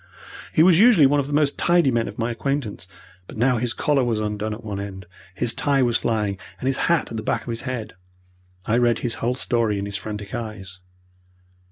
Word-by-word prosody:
He 155 - +4
was 175 -1 +6
usually 215 - +7
one 145 +2 +3
of 140 - -1
the - - -6
most 145 -1 +1
tidy 175 -5 +3
men 115 -1 0
of - - -8
my 115 +1 -1
acquaintance, 120 -6 -3 0.4
but - - -10
now 125 +2 +2
his 120 0 -1
collar 140 +1 +1
was 115 -3 0
undone 105 0 -2
at 110 +2 -7
one 105 -2 -4
end, 95 -2 -7 0.3
his 115 +3 0
tie 140 -2 +2
was 120 -2 +1
flying, 105 -4 -1 0.2
and - - -6
his 135 0 +1
hat 170 -2 +1
at 115 - -4
the - - -3
back - - -1
of - - -9
his 115 -1 -2
head. 120 -4 -5 0.7
I 115 +3 +2
read 120 -2 +3
his 120 - +1
whole 125 +2 0
story 115 -5 0
in 100 - -3
his 100 0 -3
frantic 105 0 -7
eyes. 105 -6 -6
115 Hz, 220 wpm, -23 LUFS, 105-135 Hz, 0.7 s, usually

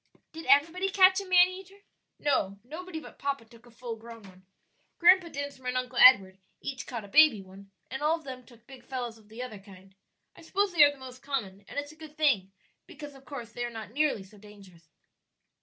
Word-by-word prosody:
"Did 325 0 -10
everybody 330 +7 +3
catch 380 0 +5
a - - -9
man 360 -1 +6
eater?" 385 +2 -11 0.4
"No; 230 -9 0
nobody 320 +6 -8
but - - -14
papa 275 -4 -3
took 230 +1 -19
a - - -16
full 235 0 -7
grown 230 0 -12
one. 185 -1 -17 0.5
Grandpa 360 0 +5
Dinsmore 285 -4 -7
and 250 0 -1
Uncle 250 -1 -3
Edward 195 -7 +7 0.2
each 270 -2 -6
caught 235 -5 -6
a - - -12
baby 300 -1 +5
one, 195 +1 -15 0.2
and 265 - -5
all 310 +2 +2
of 325 - -16
them 255 -2 -8
took 235 -1 -20
big 260 -1 -14
fellows 245 -3 -6
of 210 -1 -23
the 230 +3 -7
other 220 -5 -8
kind. 195 -1 -16 0.4
I - - -15
suppose 390 +3 -1
they 315 -3 +7
are 290 - +6
the 285 - -14
most 255 -1 -11
common, 205 -9 -4
and - - -10
it's 290 +1 -4
a - - -16
good 310 -1 -13
thing, 235 -12 +2 0.4
because 295 -1 -10
of 270 0 -17
course 245 -6 -8
they 240 - -5
are 240 - -3
not 220 -3 -9
nearly 285 -6 0
so 200 +2 -18
dangerous." 195 -6 -17
255 Hz, 220 wpm, -28 LUFS, 220-305 Hz, 0.5 s, Edward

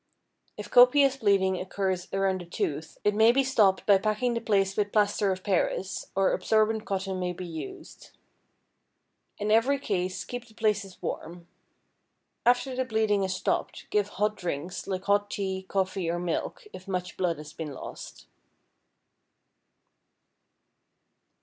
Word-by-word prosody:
If - - -8
copious 270 +2 +6
bleeding 195 -5 +2
occurs 185 -1 -2
around 195 -1 0
a - - -9
tooth, 160 -2 -3
it 210 - +3
may 220 +2 +6
be 270 +3 +3
stopped 215 -8 +3
by 200 -2 +6
packing 215 +4 0
the 230 - -2
place 195 -3 +1
with 205 -1 0
plaster 205 -1 +2
of 185 0 -4
Paris, 190 0 -1
or 195 0 +3
absorbent 220 0 +1
cotton 195 -2 -2
may 180 -1 -2
be 180 +1 -7
used. 160 -5 -9 1.3
In 210 +1 -1
every 240 +6 +4
case, 185 -8 -2
keep 245 -1 -6
the 220 - -20
places 205 -4 -1
warm. 170 +1 -5 1.0
After 250 +2 +3
the 260 - 0
bleeding 220 -4 +1
is 190 -1 -1
stopped, - - -2
give 205 -1 +2
hot 210 +1 +1
drinks, 175 0 -4
like 190 -1 -3
hot 205 0 +2
tea, 190 -2 -3
coffee, 190 -2 -1
or 170 - 0
milk, 175 - -3
if 185 - -10
much 180 -2 -3
blood 175 -3 0
has 150 +1 -10
been 160 -3 -6
lost. 135 - -9
195 Hz, 145 wpm, -28 LUFS, 185-215 Hz, 1.3 s, copious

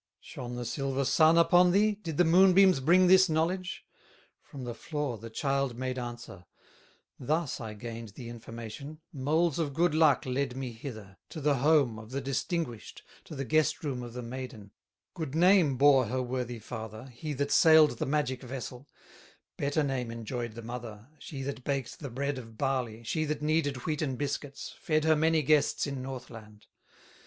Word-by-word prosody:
Shone 125 0 -8
the 120 0 -4
silver 135 +2 -2
Sun 155 +5 +5
upon 175 +2 +6
thee, 210 +4 +3
Did 170 -7 -6
the 180 - +5
moonbeams 185 0 +6
bring 175 +7 +5
this 190 0 +6
knowledge?" 180 +4 -1 0.6
From 135 -2 -10
the 120 -1 -4
floor 145 -2 -4
the 115 +2 -8
child 135 +1 -1
made 130 0 -3
answer: 120 -7 -8 0.7
"Thus 150 0 -1
I 110 -2 -6
gained 115 -1 -8
the 120 - -8
information, 120 +5 -8
Moles 155 +4 +1
of 145 -4 -2
good 175 0 +2
luck 155 -3 +4
led 130 0 -1
me 130 -2 -4
hither, 110 -5 -9
To 160 - -7
the 145 -1 +2
home 140 -5 +3
of 110 0 -11
the 135 +2 -3
distinguished, 135 - -3 0.2
To - - -9
the 135 -1 -3
guest 155 +6 +1
room 135 -5 -3
of 120 -1 -8
the 125 0 -6
maiden, 115 -4 -7 0.4
Good 155 -5 -5
name 175 -5 +4
bore 135 -3 +5
her 130 +3 -1
worthy 125 -1 -3
father, 110 0 -8
He 135 +4 -6
that 140 +1 -2
sailed 155 -6 +6
the - - -1
magic 135 -3 -1
vessel; 130 +1 -7 0.7
Better 145 +2 0
name 130 -4 -2
enjoyed 115 0 -5
the 115 - -8
mother, 115 -1 -8
She 135 -3 -7
that 135 -1 -5
baked 135 -3 -3
the 140 - -6
bread 140 +2 -2
of 115 -2 -12
barley, 125 -4 -2
She 155 +7 -1
that 150 0 -3
kneaded 145 -4 0
wheaten 150 -4 -1
biscuits, 140 +1 -4
Fed 155 -1 +1
her 160 0 +4
many 160 0 +2
guests 150 +1 +2
in 140 -2 -4
Northland. 115 -5 -9
135 Hz, 175 wpm, -29 LUFS, 120-155 Hz, 0.7 s, upon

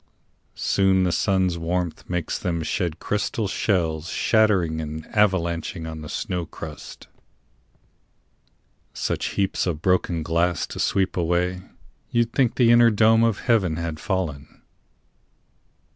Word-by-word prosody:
Soon 95 -1 +2
the 90 - +1
sun's 95 -2 +1
warmth 85 0 -3
makes 90 -2 -2
them 85 -2 -2
shed 85 +1 -2
crystal 105 +3 -2
shells 85 -5 -1
Shattering 95 -8 +2
and 80 0 -6
avalanching 85 -5 0
on 80 -1 -7
the 75 - -8
snow 90 -2 -3
crust 80 -3 -10 1.9
Such - - -2
heaps 95 -1 0
of 80 -3 -3
broken 90 -3 +1
glass 85 +2 0
to - - -9
sweep 95 -1 +1
away 90 +1 0 0.5
You'd 120 -1 0
think 130 -4 +2
the 120 -2 +4
inner 120 0 +7
dome 110 +1 +4
of 115 -3 +1
heaven 100 -9 +2
had 85 -1 -4
fallen. 80 -8 -4
90 Hz, 125 wpm, -23 LUFS, 80-100 Hz, 1.9 s, inner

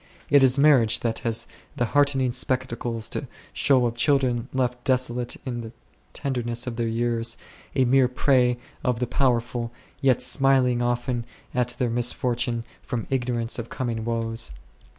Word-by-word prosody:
It 145 -1 +7
is 130 0 +6
marriage 130 -6 +4
that 115 -1 -1
has 115 0 0 0.3
the 120 - +1
heartrending 140 -3 +3
spectacles 120 -3 -2
to - - -4 0.3
show 130 -3 +3
of 115 -1 -1
children 125 -3 +2
left 125 -2 -1
desolate 125 -2 0
in 120 -2 -3
the 110 -1 -8 0.4
tenderness 120 -3 -2
of 125 -2 -4
their 115 0 -1
years, 115 0 -1 0.4
a 130 - +3
mere 130 +1 +4
prey 125 -1 +2 0.3
to 125 - +2
the 125 +1 -2
powerful, 120 -2 0 0.3
yet 130 -3 +3
smiling 130 -1 +3
often 120 0 -1 0.3
at 125 -1 0
their 125 -2 0
misfortune 120 0 0 0.2
from 120 -3 -4
ignor 125 -2 0
ance 115 +1 -2
of 120 - -6
coming 115 -3 -3
woes. 115 0 -1
120 Hz, 150 wpm, -25 LUFS, 115-130 Hz, 0.4 s, It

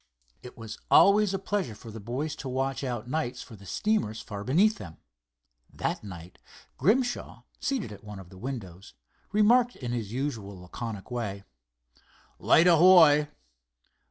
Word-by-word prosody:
It 125 - -12
was 115 -2 -8
always 205 0 +6
a 195 - -1
pleasure 190 - -3
for 110 +2 -11
the 110 - -8
boys 130 +8 -4
to 135 - -6
watch 135 0 -2
out 120 -3 -4
nights 125 -3 -3
for 115 - -13
the 100 -1 -14
steamers 160 - -1
far 100 -2 -7
beneath 190 - +3
them. 80 -4 -10 0.7
That - - -3
night, 90 -3 -10 0.4
Grimshaw, 245 - 0 0.2
seated 265 - -2
at 105 - -11
one 105 -1 -9
of 95 -2 -11
the 95 - -14
windows, 100 -7 -7 0.4
remarked 235 +4 +4
in 120 -3 -5
his 115 -4 -3
usual 115 -7 -4
laconic 105 +4 -7
way: 105 -5 -4 1.0
"Light 165 - +5
ahoy!" 165 -4 +7
125 Hz, 150 wpm, -28 LUFS, 105-175 Hz, 1.0 s, ahoy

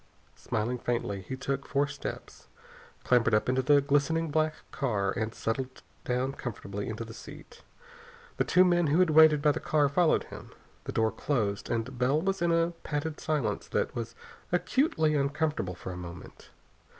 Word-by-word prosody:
Smiling 120 +4 -2
faintly, 115 -5 -2
he 130 - -6
took 135 +1 -3
four 140 +1 +2
steps, 145 - -8 0.6
clambered 115 -3 +3
up 105 - +1
into 130 +1 +2
the 145 +2 +5
glistening 145 +3 +1
black 155 +1 +1 0.2
car, 105 -8 0
and 110 0 -2
settled 130 +3 -3 0.2
down 125 +2 0
comfortably 100 -5 -5
into 110 +1 -5
the 115 - -10
seat. - - -12 0.8
The - - +3
two 185 +1 +5
men 175 -2 +3
who 150 +3 +2
had 180 -3 +4
waited 155 -1 +6
by 150 - +5
the - - -3
car 150 -2 +2
followed 160 +3 +3
him. - - -11 0.3
The - - -4
door 110 0 +1
closed, 105 -8 -1
and 120 +2 -3
Bell 130 +4 +3
was 195 +2 -1
in 170 0 +2
a 165 0 +2
padded 150 +1 -3
silence 150 -5 -1
that - - -1
was 115 0 -5 0.4
acutely 180 - +2
uncomfortable 145 - -1
for 90 - -7
a 90 - -7
moment. 85 -1 -10
140 Hz, 170 wpm, -29 LUFS, 115-155 Hz, 0.8 s, waited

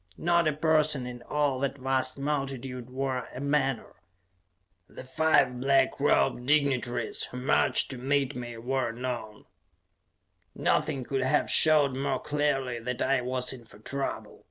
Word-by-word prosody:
Not 170 -1 +2
a 155 - +2
person 155 -3 +2
in 120 -1 -8
all 145 +1 -1
that 140 0 -2
vast 130 0 0
multitude 135 -3 -4
wore 130 -1 -3
a - - -5
menore; 140 -3 -1 0.9
the - - -10
five 130 -2 +2
black 135 +1 +2
robed 125 -3 +2
dignitaries 130 -6 +1
who 125 - -9
marched 125 +2 +1
to 130 - -6
meet 140 +1 0
me 120 -1 -6
wore 125 +1 -1
none. 120 -3 -6 1.1
Nothing 135 -2 0
could 135 +2 -2
have 130 +3 +1
showed 150 -4 +5
more 135 +1 -1
clearly 145 -5 -1
that 125 +2 -4
I 135 -2 +2
was 125 +1 -2
in 125 -2 -11
for 110 - -16
trouble. 135 +6 -4
135 Hz, 145 wpm, -28 LUFS, 125-140 Hz, 1.1 s, showed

